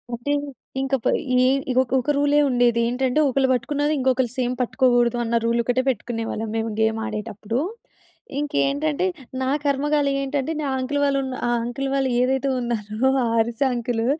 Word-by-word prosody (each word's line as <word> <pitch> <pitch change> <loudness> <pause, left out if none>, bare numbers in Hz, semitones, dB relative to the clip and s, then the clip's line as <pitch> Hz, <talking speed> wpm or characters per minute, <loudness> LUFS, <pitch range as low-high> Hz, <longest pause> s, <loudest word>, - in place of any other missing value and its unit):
అంటే 240 +5 -2 0.5
ఇంకపై 270 -3 0 0.2
ఈ 250 - +5 0.3
ఇగ 250 - -2
ఒక 250 - -16
ఒక 295 - 0
రూలే 290 +1 +3
ఉండేది. 245 -2 +3
ఏంటంటే 255 +3 0
ఒకళ్ళు 270 0 +2
పట్టుకున్నది 290 +5 0
ఇంకొకళ్ళు 260 -2 +1
సేమ్ 250 -1 0
పట్టుకోకూడదన్న 240 -2 +2
రూల్ 235 +1 +1
ఒకటే 245 +2 +1
పెట్టుకునేవాళ్ళం 225 -2 -3
మేము 225 0 -1
గేమాడేటప్పుడు. 220 0 -2 0.8
ఇంకేంటంటే 150 - 0 0.4
నా 260 +1 0
కర్మ‌కాలి 285 0 +1
ఏంటంటే, 275 +2 -2
నా 290 - -2
అంకుల్ 275 +3 -1
వాళ్ళు 275 -1 +2
ఉన్న 260 -1 -4
ఆ - - +1
అంకుల్ 245 +3 -3
వాళ్ళు 270 -1 +1
ఏదైతే 265 +2 +1
ఉన్నారో 230 0 -1 0.2
ఆ - - +1
అరిసే 235 +4 +1
అంకులు 235 -1 -1
250 Hz, 150 wpm, -23 LUFS, 230-270 Hz, 0.8 s, ఈ